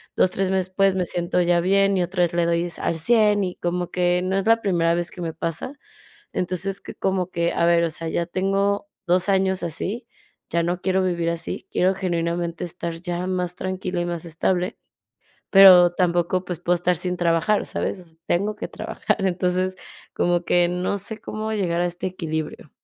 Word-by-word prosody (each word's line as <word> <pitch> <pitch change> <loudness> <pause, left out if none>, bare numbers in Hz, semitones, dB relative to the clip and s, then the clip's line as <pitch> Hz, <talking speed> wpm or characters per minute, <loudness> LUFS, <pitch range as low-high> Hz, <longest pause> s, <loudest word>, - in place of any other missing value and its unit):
2, 180 - +3
3 195 -1 -1
meses, 185 -1 -1
pues, 195 -1 +3
me 185 - +1
siento 175 +1 0
ya 175 0 +3
bien, 195 +2 +3
y 180 - +2
otra 180 0 0
vez 170 - 0
le 170 -1 +2
doy 170 0 +1
s 175 -2 -5
al 165 - -1
cien, 210 +2 +3
y 180 -1 -3
como 175 0 -2
que 180 0 +1
no 190 +1 0
es 195 - -1
la 230 0 +4
primera 170 -4 +2
vez 175 0 -2
que 180 - -9
me 165 -2 -3
pasa. 165 - -4 0.6
Entonces, 185 +2 -2
que - - -9
como 185 -1 -1
que, 170 0 0
a 170 - +1
ver, 170 0 +4
o 165 - 0
sea, 165 +1 -6
ya 170 +1 -1
tengo 195 +3 0 0.2
2 180 +2 +2
años 190 -1 +2
así, 200 +8 -3 0.4
ya 170 0 +1
no 175 +1 -1
quiero 190 0 +1
vivir 170 -2 0
así, 170 -1 -5
quiero 185 +1 +2
genuinamente 170 -2 -2
estar 170 -1 -5
ya 175 0 -3
más 180 -1 -1
tranquila 185 -1 -3
y 175 - -1
más 175 -1 -4
estable, 180 +4 -1 0.7
pero 185 -3 +8
tampoco 175 0 +1
pues 180 -3 -5
puedo 175 0 +1
estar 175 0 +1
sin 180 +1 -2
trabajar, 175 +5 +1
¿sabes?, 170 -4 -4
tengo 205 +4 0
que - - -4
trabajar. - - -2
Entonces, 185 0 0 0.4
como 175 0 +1
que 175 0 +3
no 180 +3 -1
sé 215 +2 -7
cómo 215 +1 -4
llegar 175 -5 0
a - - +2
este 175 +1 -3
equilibrio. 160 -4 -5
180 Hz, 195 wpm, -23 LUFS, 170-190 Hz, 0.7 s, pero